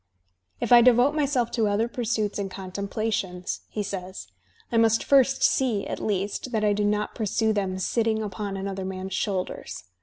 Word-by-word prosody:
"If - - -3
I 240 -1 +9
devote 250 +3 +5
myself 280 -6 0
to 225 -3 +1
other 205 +3 +1
pursuits 220 -4 -2
and 195 -1 -2
contemplations,'' 195 -1 -3
he 210 - -3
says, 185 - -6 0.5
"I 230 - +1
must 225 0 +4
first 270 -1 +4
see, 235 -7 +2
at - - -4
least, 205 +4 -2
that 220 -1 0
I 210 -1 +3
do 205 +1 0
not 210 0 0
pursue 220 0 0
them 190 -3 -1
sitting 220 +3 0
upon 200 -1 -4
another 195 0 -4
man's 190 0 -5
shoulders. 185 - -3
210 Hz, 170 wpm, -25 LUFS, 195-230 Hz, 0.5 s, I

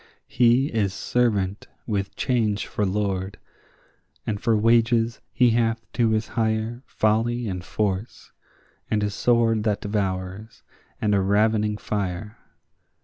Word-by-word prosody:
He 120 +2 +4
is 100 -4 -1
servant 105 -5 0 0.2
with 100 -3 -2
Change 110 -5 0
for 105 - -1
lord, 95 -1 -2 0.9
and 105 -2 -3
for 115 -2 +2
wages 115 +1 +2
he 125 -2 +4
hath 115 0 0
to 120 -2 +2
his 110 0 0
hire 110 +1 -1
Folly 115 +2 +1
and 90 -2 -4
force, 100 +2 -3 0.6
and 105 -1 +1
a 105 - 0
sword 115 0 +2
that 105 -2 0
devours, 100 +1 -3 0.4
and 105 -1 +1
a 100 - +3
ravening 105 +2 +2
fire. 100 +1 -4
110 Hz, 125 wpm, -24 LUFS, 100-115 Hz, 0.9 s, He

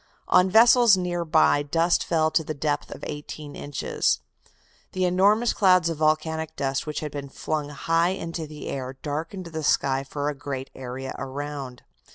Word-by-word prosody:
On 180 +1 +5
vessels 230 0 +6
near 175 -1 -2
by 155 -2 +3
dust 165 +4 +1
fell 160 -2 +1
to 160 - +2
the 155 0 -5
depth 145 0 -2
of - - -10
eighteen 150 0 -7
inches. 145 - -1 0.7
The 185 0 0
enormous 200 +6 +3
clouds 185 -4 +4
of 165 - -3
volcanic 155 +1 0
dust 135 +1 -2
which 150 - -3
had 150 -2 -4
been 140 -1 -6
flung 150 +1 -3
high 165 +4 +1
into 165 -3 -4
the 150 0 -9
air 130 -1 -5
darkened 165 +6 -4
the 160 -2 -5
sky 135 -2 +1
for 145 +1 -4
a 150 - 0
great 135 -1 -6
area 130 +1 -6
around. 135 -1 -6
155 Hz, 170 wpm, -25 LUFS, 145-170 Hz, 0.7 s, vessels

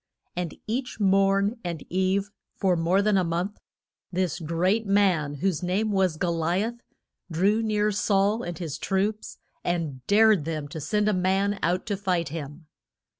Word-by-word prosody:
And 175 -2 -3
each 250 +3 -3
morn 195 +2 +3
and 170 -4 -4
eve, 190 +2 0 0.2
for 190 -3 +2
more 175 +4 +2
than 210 -1 +3
a 185 - +3
month, 175 +4 -2 0.5
this 180 -2 -1
great 180 +7 0
man, 185 -8 +2
whose 175 +3 -1
name 195 +5 0
was 190 -5 +1
Go 175 +1 0
li 170 +4 0
ath, 235 +2 -4 0.5
drew 195 +7 +2
near 210 -1 +1
Saul 205 +2 +2
and 175 -2 -5
his 160 -5 -5
troops 205 +2 -1 0.3
and 160 -7 -2
dared 210 -4 +5
them 155 -2 -3
to 160 - -6
send 210 +8 0
a 215 - +3
man 195 +2 +1
out 180 +2 0
to 210 -3 -1
fight 180 -5 0
him. 150 +1 -7
190 Hz, 165 wpm, -26 LUFS, 170-205 Hz, 0.5 s, dared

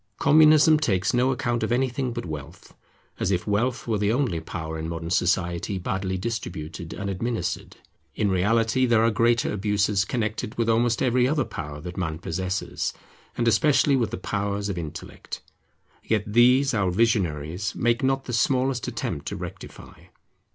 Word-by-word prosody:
Communism 155 +1 +6
takes 95 -11 +1
no 125 +1 +3
account 120 -2 -1
of - - -1
anything 130 +1 0
but 120 -3 -5
wealth; 75 0 -8 0.5
as - - 0
if 90 -3 0
wealth 120 +5 -1
were 110 -3 0
the 105 +1 +2
only 120 - 0
power 80 -1 -6
in 80 +1 -4
modern 85 0 -5
society 90 +1 0
badly 95 +1 -2
distributed 90 -6 -5
and 100 +3 -5
administered. 115 +4 -3 0.4
In 100 -2 +1
reality 115 +7 +2
there 115 -2 +4
are 115 - +3
greater 115 +2 +2
abuses 105 -1 +1
connected 105 -1 -3
with 115 -1 0
almost 115 +1 +2
every 125 0 +3
other 145 -1 +1
power 75 -2 -7
that 90 +2 -8
man 80 -4 -2
possesses; 95 +3 -3 0.4
and 120 - +1
especially 140 +5 +4
with 120 -4 +1
the - - -5
powers 100 0 -2
of 95 - -3
intellect; 80 -3 -8 0.6
yet 110 -2 0
these 125 +5 +4
our 100 -4 +1
visionaries 90 - 0
make 120 0 +1
not 135 0 0
the 125 - -5
smallest 130 +2 +1
attempt - - -4
to - - -3
rectify. - - -9
105 Hz, 160 wpm, -25 LUFS, 90-120 Hz, 0.6 s, Communism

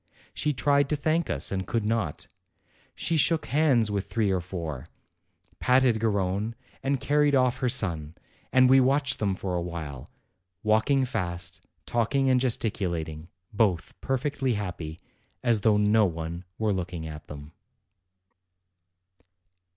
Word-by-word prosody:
She 150 - 0
tried 140 +2 +2
to 150 - +1
thank 155 +3 0
us, - - +1
and 95 -1 -2
could 115 -3 -1
not; 110 -9 -1 0.7
she 165 - 0
shook 160 +1 +2
hands 135 -8 +2
with 100 -1 -2
three 105 -4 +1
or 95 -2 0
four, 85 -7 -6 0.7
patted 125 -3 +3
Garrone, 105 0 0 0.3
and 135 0 0
carried 145 0 +2
off 125 -2 +3
her 125 - +1
son; 85 - -1 0.4
and 130 0 +6
we 135 +1 +7
watched 135 +1 +2
them 100 -3 0
for 95 -1 -4
a 90 - 0
while, 80 -6 -6 0.5
walking 110 +6 +3
fast, 85 -7 -4 0.2
talk 120 +3 0
ing 135 -1 +3
and 130 - +4
gesticulating, 85 -10 -2 0.3
both 100 -6 +1
perfectly 135 -1 -1
happy, 85 -6 -5 0.4
as 115 -4 +2
though 105 0 +4
no 105 0 +4
one 85 +1 -5
were 110 -2 +1
looking 90 -3 -4
at 75 -1 -8
them. 75 0 -9
110 Hz, 140 wpm, -27 LUFS, 85-130 Hz, 0.7 s, we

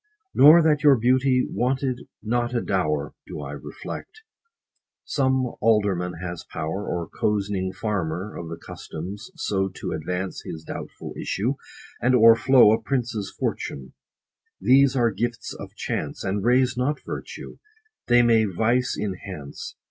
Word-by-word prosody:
Nor 155 +4 +8
that 150 -2 +3
your 145 -2 +7
beauty 125 +2 +3
wanted 130 0 -1 0.2
not 120 +2 0
a 120 - +1
dower, 75 -7 -1
Do - - -7
I 70 -1 -6
reflect. 390 - -8 0.8
Some 130 -3 +1
alderman 100 -5 +2
has 85 0 -6
power, 80 +6 -4
Or 85 -2 -2
cozening 100 -3 -1
farmer 95 -1 -3
of 85 - -6
the 85 - -6
customs, 95 - -8
so 95 -12 0
30 95 - -11
To - - -3
advance 90 +1 -3
his 80 - -7
doubtful - - -7
issue, 120 +7 -1 0.5
and 130 +1 +4
o'erflow 120 +1 +7
A 110 +1 +2
prince's 115 -5 -2
fortune: 65 -2 -3 0.7
these 135 +1 +5
are 120 -3 +3
gifts 115 +4 -3
of - - -10
chance, - - -4
And 100 +1 -1
raise 125 +2 +3
not 130 +4 0
virtue; - - -7 0.5
they 120 0 +6
may 115 -2 +4
vice 115 +6 +1
enhance. 95 -7 -6
110 Hz, 140 wpm, -24 LUFS, 95-125 Hz, 0.8 s, Nor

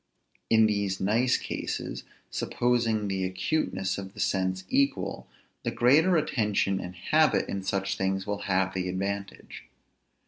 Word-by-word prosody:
In 110 -1 +6
these 100 -3 0
nice 115 +6 +2
cases, - - -4 0.3
supposing 115 -3 0
the 95 -1 -1
acuteness 95 - -1
of 95 +1 -8
the - - -10
sense 95 -1 0
equal, 140 0 0 0.3
the - - -2
greater 160 +9 +4
attention 105 -9 +1
and 90 0 -7
habit 155 - +2
in 100 - -3
such 95 0 -1
things 95 0 -1
will 105 -1 -2
have 95 0 +2
the 90 -1 -2
advantage. 100 +2 -5
100 Hz, 135 wpm, -28 LUFS, 95-115 Hz, 0.3 s, In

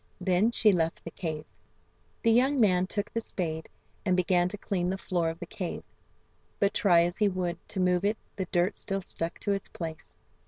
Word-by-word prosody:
Then 185 +3 +3
she 225 -2 +5
left 165 -3 0
the 165 - -7
cave. 155 -3 -4 0.8
The 230 - +5
young 260 +4 +4
man 185 -5 +4
took 205 +1 -3
the 230 - 0
spade, 160 -7 -4 0.3
and 185 -3 +2
began 180 0 +3
to 205 - -6
clean 180 -3 -1
the 190 - -1
floor 175 -3 0
of 165 - -5
the 175 - -6
cave, 185 -1 -5 0.8
but 200 0 +2
try 180 -7 +5
as 175 +1 -2
he 210 - +3
would 180 -2 -2
to 195 - -2
move 180 0 +2
it 210 +2 +1 0.2
the 190 - -2
dirt 175 +2 +1
still 195 -1 -2
stuck 165 -2 -4
to 205 - 0
its 195 - -3
place. 160 -2 -7
185 Hz, 200 wpm, -29 LUFS, 175-205 Hz, 0.8 s, she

